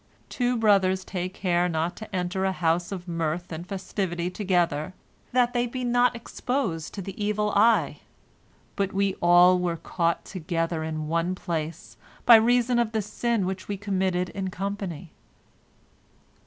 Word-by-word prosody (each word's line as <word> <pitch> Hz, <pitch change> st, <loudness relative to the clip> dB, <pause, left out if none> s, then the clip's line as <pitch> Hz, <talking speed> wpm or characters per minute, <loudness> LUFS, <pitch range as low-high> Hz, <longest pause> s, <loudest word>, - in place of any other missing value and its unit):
Two 245 Hz, -1 st, 0 dB
brothers 190 Hz, -4 st, +3 dB
take 185 Hz, 0 st, -4 dB
care 180 Hz, -1 st, +1 dB
not 165 Hz, +1 st, -1 dB
to 215 Hz, -3 st, -8 dB
enter 180 Hz, +1 st, -1 dB
a 190 Hz, -, +2 dB
house 175 Hz, 0 st, 0 dB
of 185 Hz, -2 st, -6 dB
mirth 165 Hz, +1 st, -2 dB
and 165 Hz, +2 st, -6 dB
festivity 185 Hz, -2 st, -3 dB
together, 180 Hz, -4 st, 0 dB, 0.4 s
that 245 Hz, -1 st, +2 dB
they 245 Hz, 0 st, +1 dB
be 255 Hz, +1 st, -5 dB
not 245 Hz, 0 st, +3 dB
exposed 230 Hz, -, -3 dB
to 195 Hz, -, -5 dB
the 195 Hz, +2 st, -6 dB
evil 210 Hz, 0 st, 0 dB
eye, 220 Hz, +3 st, +3 dB, 0.8 s
but 195 Hz, -2 st, -1 dB
we 195 Hz, 0 st, +1 dB
all 175 Hz, +1 st, +6 dB
were 175 Hz, -2 st, -1 dB
caught 170 Hz, 0 st, -1 dB
together 165 Hz, -2 st, -2 dB
in 155 Hz, -1 st, -4 dB
one 170 Hz, +3 st, 0 dB
place, 165 Hz, -3 st, -5 dB, 0.3 s
by 235 Hz, -, +10 dB
reason 240 Hz, +2 st, +4 dB
of 235 Hz, -1 st, 0 dB
the 220 Hz, -, +1 dB
sin 215 Hz, 0 st, -1 dB
which 185 Hz, 0 st, -4 dB
we 205 Hz, -, -3 dB
committed 190 Hz, -2 st, -1 dB
in 190 Hz, 0 st, -4 dB
company." 185 Hz, -3 st, -5 dB
185 Hz, 155 wpm, -26 LUFS, 175-210 Hz, 0.8 s, by